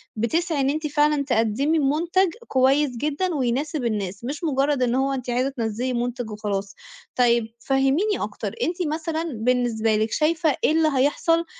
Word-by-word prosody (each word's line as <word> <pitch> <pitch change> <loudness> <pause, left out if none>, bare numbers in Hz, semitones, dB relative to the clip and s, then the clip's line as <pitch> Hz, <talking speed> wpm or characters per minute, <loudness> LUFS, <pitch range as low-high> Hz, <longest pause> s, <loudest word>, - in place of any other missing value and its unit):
بتسْعي 315 +7 0
إن 270 - +2
أنتِ 305 +1 -1
فعلًا 295 -1 +2
تقدمي 255 +5 +1
مُنتَج 335 +6 +2 0.2
كويس 265 0 +2
جدًا، 305 +6 -1
ويناسب 275 +2 -1
الناس، 205 -3 -3
مش 285 +7 -5
مُجرد 280 -3 +1
إن 245 0 +1
هو 270 +1 +1
أنتِ 255 -2 -4
عايزة 250 +2 +1
تنزِّلي 245 -1 -2
منتج 245 -1 -3
وخلاص. 200 -2 -4 0.4
طيب 235 -2 +2
فهِّميني 270 - +1
أكتر، - - -4
أنتِ 350 0 -1
مثلًا 320 0 -2
بالنسبة 225 -1 +1
لِك 215 +1 0
شايفة 315 -1 +1
إيه - - +4
اللي 320 0 +3
هيحصل 330 +5 +2
270 Hz, 155 wpm, -23 LUFS, 235-310 Hz, 0.4 s, إيه